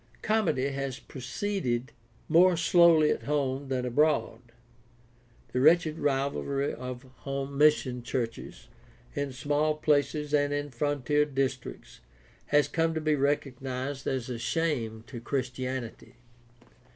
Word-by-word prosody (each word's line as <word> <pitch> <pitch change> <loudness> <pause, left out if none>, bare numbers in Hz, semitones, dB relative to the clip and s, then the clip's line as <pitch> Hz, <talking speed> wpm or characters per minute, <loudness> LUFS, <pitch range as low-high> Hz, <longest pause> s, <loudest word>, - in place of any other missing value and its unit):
Comity 165 -12 +1
has 135 -2 -3
proceeded 130 -2 -3 0.4
more 175 +2 +5
slowly 165 -3 +5
at - - -1
home 140 -1 -1
than 130 -1 -1
abroad. 150 +5 +1 1.1
The 125 - +1
wretched 160 +1 +4
rivalry 140 0 -1
of 125 +1 -7
home 135 0 -4
mission 140 -4 +3
churches 115 -1 -5 0.5
in 140 -1 -2
small 145 +4 0
places 150 0 0
and 145 -1 +3
in 145 0 -2
frontier 145 +2 +1
districts 135 -3 -4 0.5
has 145 0 +3
come 165 0 0
to - - 0
be 155 0 +2
recognized 135 -1 -2
as 130 -3 -1
a 125 -2 -5
shame 120 -7 -1
to 125 -2 -8
Christianity. 130 -1 -4
140 Hz, 115 wpm, -28 LUFS, 130-150 Hz, 1.1 s, more